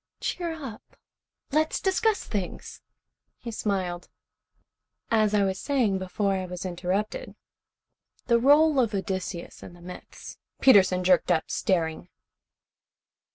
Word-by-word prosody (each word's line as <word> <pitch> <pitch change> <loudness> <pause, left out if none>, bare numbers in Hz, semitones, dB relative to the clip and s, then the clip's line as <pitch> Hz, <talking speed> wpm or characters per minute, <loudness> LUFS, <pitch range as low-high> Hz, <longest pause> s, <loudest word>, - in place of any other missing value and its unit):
"Cheer 340 -2 -3
up! 270 -9 -10 0.5
Let's 310 +2 +1
discuss 405 +2 +1
things." 195 -4 -5 0.6
He 235 - -7
smiled. 185 -5 -3 1.0
"As 215 -2 +3
I 205 - +3
was 190 0 -1
saying 240 -9 +1
before 195 +2 -1
I 185 -1 -2
was 180 +1 -6
interrupted, 185 - -3 0.9
the 235 -1 +3
role 290 +3 +5
of 225 -4 +1
Odysseus 190 -3 -4
in - - -11
the 175 - -16
myths 180 +1 -11
" - - -55
Peterson 190 -7 +5
jerked 180 0 +3
up, 160 -2 0
staring. 165 -4 -1
200 Hz, 120 wpm, -26 LUFS, 180-260 Hz, 1.0 s, role